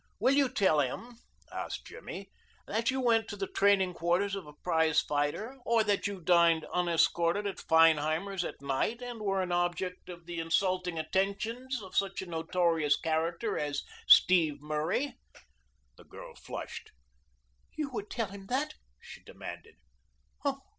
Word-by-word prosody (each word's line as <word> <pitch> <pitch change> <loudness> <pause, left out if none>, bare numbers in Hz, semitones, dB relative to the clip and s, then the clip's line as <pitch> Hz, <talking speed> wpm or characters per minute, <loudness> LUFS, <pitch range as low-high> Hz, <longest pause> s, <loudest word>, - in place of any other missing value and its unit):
"Will 265 - +4
you 280 -2 +3
tell 190 -11 +3
him," 230 - -3 0.3
asked - - -5
Jimmy, 195 - -9 0.3
"that 225 +4 0
you 265 0 0
went 230 -3 +3
to 205 - -5
the 200 -1 -3
training 195 -2 +3
quarters 175 +4 0
of 195 -5 -5
a 150 - -11
prize 160 -3 +3
fighter, 150 - -2
or 230 -1 +3
that 205 -2 +1
you 200 -2 -5
dined 170 -2 +4
unescorted 170 +2 +2
at 200 - -3
Feinheimer's 165 +4 +3
at - - -6
night 140 - -1
and 240 -3 -6
were 195 -2 0
an 180 - -4
object 175 +1 -1
of 175 -1 -9
the 170 -1 -5
insulting 180 +1 0
attentions 205 +9 -2
of 190 - -11
such 195 -1 +1
a - - -7
notorious 165 -3 +1
character 165 +6 -1
as 145 -1 -2 0.2
Steve 160 -6 +6
Murray?" 155 - -2 0.8
The - - -16
girl - - -11
flushed. - - -8 0.9
"You 300 -3 -3
would 210 -4 -5
tell 230 -5 -2
him 195 0 -10
that?" 270 +6 -1 0.3
she - - -12
demanded. - - -10
185 Hz, 150 wpm, -30 LUFS, 165-210 Hz, 0.9 s, Steve